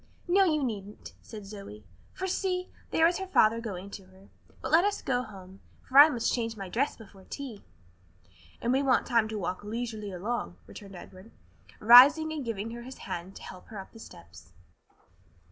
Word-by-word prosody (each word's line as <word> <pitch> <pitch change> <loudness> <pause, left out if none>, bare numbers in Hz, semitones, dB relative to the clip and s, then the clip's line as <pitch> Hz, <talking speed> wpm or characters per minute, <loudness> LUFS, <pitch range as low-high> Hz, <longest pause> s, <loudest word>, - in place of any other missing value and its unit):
"No, 385 +2 +4
you 305 -4 +1
needn't," 210 -4 -6
said 215 -3 -10
Zoe, 195 - -10 0.3
"for 380 - -4
see, 365 -1 -2 0.2
there 325 - +3
is 345 +2 +2
her 380 - -5
father 230 - +3
going 200 -3 -7
to 195 -1 -9
her. 190 +1 -20 0.3
But 265 - -5
let 330 +3 +6
us 410 0 0
go 250 -2 -1
home, 195 -4 -12 0.3
for 265 +2 +5
I 295 +2 +10
must 235 -5 -1
change 230 -2 -2
my 195 -2 -7
dress 265 +9 -1
before 200 -4 -15
tea." 260 -7 -7 1.0
"And 240 +2 +1
we 270 - +2
want 265 -3 +2
time 230 -4 +2
to 220 0 -5
walk 185 0 -4
leisurely 220 -1 -5
along," 190 - -4
returned 195 -2 -12
Edward, 185 +4 -13 0.5
rising 285 +8 +8
and 300 -3 -4
giving 225 -2 -4
her 235 +1 -7
his 260 +2 -10
hand 175 +3 -6
to - - -11
help 185 -1 -11
her 220 - -10
up 190 - -9
the 225 - -14
steps. 85 - -14
225 Hz, 190 wpm, -28 LUFS, 195-270 Hz, 1.0 s, I